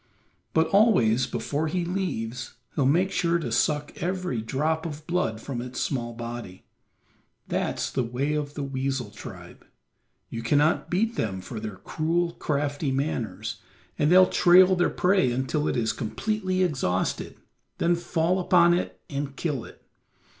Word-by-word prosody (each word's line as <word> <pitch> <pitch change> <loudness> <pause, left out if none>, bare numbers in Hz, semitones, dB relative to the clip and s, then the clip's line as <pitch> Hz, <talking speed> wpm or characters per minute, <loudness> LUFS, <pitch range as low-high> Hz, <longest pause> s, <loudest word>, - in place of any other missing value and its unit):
But 160 0 +5
always 130 - +4
before 150 +2 -2
he 175 +2 -1
leaves 125 -10 -3 0.2
he'll 135 -3 +2
make 180 +7 +3
sure 170 -2 +2
to 155 -9 -4
suck 145 +5 +1
every 180 -8 -1
drop 155 +8 -1
of 150 -1 -8
blood 155 -11 -1
from 120 0 -5
its 125 +1 -6
small 120 -4 -2
body. 115 -5 -7 0.8
That's - - -1
the - - 0
way 125 +5 -1
of 150 -1 -3
the 145 - -3
weasel 135 -4 -2
tribe; 100 - -11 0.6
you 115 - -5
cannot 145 +7 +2
beat 225 +6 0
them 95 -4 -1
for 110 +5 -7
their 105 -2 -5
cruel, 170 - -1
crafty 145 -2 -1
manners, 130 -8 -3 0.4
and 150 +2 +3
they'll 185 +1 +8
trail 185 +2 +6
their 175 0 +2
prey 180 -9 +2
until 130 +4 -1
it - - 0
is 115 -1 +1
completely 185 - -1
exhausted, 130 - -1 0.4
then 170 - +2
fall 170 +1 0
upon 175 -1 +5
it 175 - -2
and 140 -1 -4
kill 145 -6 -2
it. - - -15
145 Hz, 150 wpm, -26 LUFS, 120-175 Hz, 0.8 s, they'll